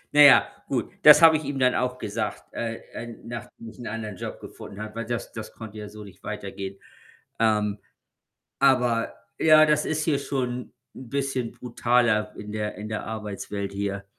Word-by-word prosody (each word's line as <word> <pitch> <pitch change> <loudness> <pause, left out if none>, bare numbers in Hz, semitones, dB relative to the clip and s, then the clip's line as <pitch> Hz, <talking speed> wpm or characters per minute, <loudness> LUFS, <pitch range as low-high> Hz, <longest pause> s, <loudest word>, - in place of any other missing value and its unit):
Na 150 - +8
ja, 145 -2 +9 0.2
gut, - - -2
das 150 +2 +9
habe 160 -1 +9
ich 155 - -7
ihm 140 -1 -3
dann 125 -1 +3
auch 125 +1 -1
gesagt, 110 0 -3
äh, 115 -1 -3 0.2
äh, 120 - -6 0.2
nachdem 115 0 -8
ich 110 +1 -12
'n 120 - -6
anderen 110 -2 -5
Job - - -6
gefunden 100 - -10
habe, 110 0 -6
weil 115 0 -4
das 120 0 -3
das 110 -1 -7
konnte 110 -1 -9
ja 105 -1 -7
so 105 0 -10
nicht 100 - -14
weitergehen. 95 0 -6 0.6
Ähm, 105 -2 +2 0.8
aber, 125 -4 +3 0.2
ja, 155 -1 +7
das 150 0 +2
ist 155 -1 -1
hier 145 -3 +1
schon 125 -3 -3 0.2
'n 130 -3 -10
bisschen 135 -4 -1
brutaler 120 -3 +1
in 105 0 -8
der 105 -1 -3
in 105 +1 -6
der 110 - -3
Arbeitswelt 105 -2 -5
hier. 100 0 -3
115 Hz, 180 wpm, -25 LUFS, 105-130 Hz, 0.8 s, ja